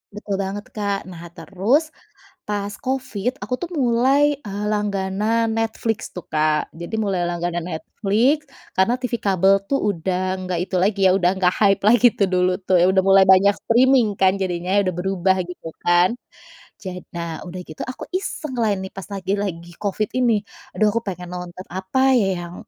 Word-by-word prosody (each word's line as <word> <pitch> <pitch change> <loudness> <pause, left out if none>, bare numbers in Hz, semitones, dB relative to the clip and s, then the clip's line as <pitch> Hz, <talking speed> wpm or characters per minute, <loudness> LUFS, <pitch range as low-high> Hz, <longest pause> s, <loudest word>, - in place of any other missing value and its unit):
Betul 200 -1 -4
banget 200 +1 -4
Kak. 200 -2 -2
Nah 170 -1 -9
terus 255 - 0 0.6
pas 205 -1 -2
Covid 255 -2 -2
aku 250 - -2
tuh 350 0 -5
mulai 275 +3 +3
eee 205 -2 -5
langganan 210 +2 0
Netflix 225 0 -2
tuh 180 - -6
Kak, 155 0 +1
jadi 170 +6 -6
mulai 195 -5 0
langganan 175 0 -2
Netflix 230 - 0 0.2
karena 230 +7 +2
TV 250 -1 -4
kabel 195 0 +3
tuh 275 - +2 0.2
udah 180 +1 -2 0.3
nggak 180 - -1
itu 185 - -8
lagi 200 +1 +1
ya 185 - +6
udah 180 -2 +3
nggak 185 -1 +2
hype 200 -2 +4
lagi 240 +3 +6
tuh 200 - +4
dulu 180 0 +2
tuh 185 -2 +3
udah 190 0 +3
mulai 195 0 +6
banyak 190 +2 +6 0.2
streaming 240 -3 +4
kan 190 -1 +4
jadinya 185 +2 0
udah 185 -3 -1
berubah 190 0 +1
gitu 175 -2 -9 0.2
kan. 175 +1 +5 0.7
Jad 180 -2 -6
nah 170 -2 -4
udah 180 +1 -7
gitu 155 - -13
aku 255 - -6
iseng 340 -7 -3
lah 220 -2 +2
ini 190 0 -7
pas 195 - -9
lagi 195 -1 -3
lagi 175 -3 -5
Covid 205 +1 -2
ini. 245 -3 +2 0.4
Aduh 215 -1 +3
aku 230 - 0
pengen 180 -2 -6
nonton 180 +1 -7
apa 260 +9 +1
ya 195 - +2 0.2
yang 170 - -10
195 Hz, 170 wpm, -21 LUFS, 180-225 Hz, 0.7 s, ya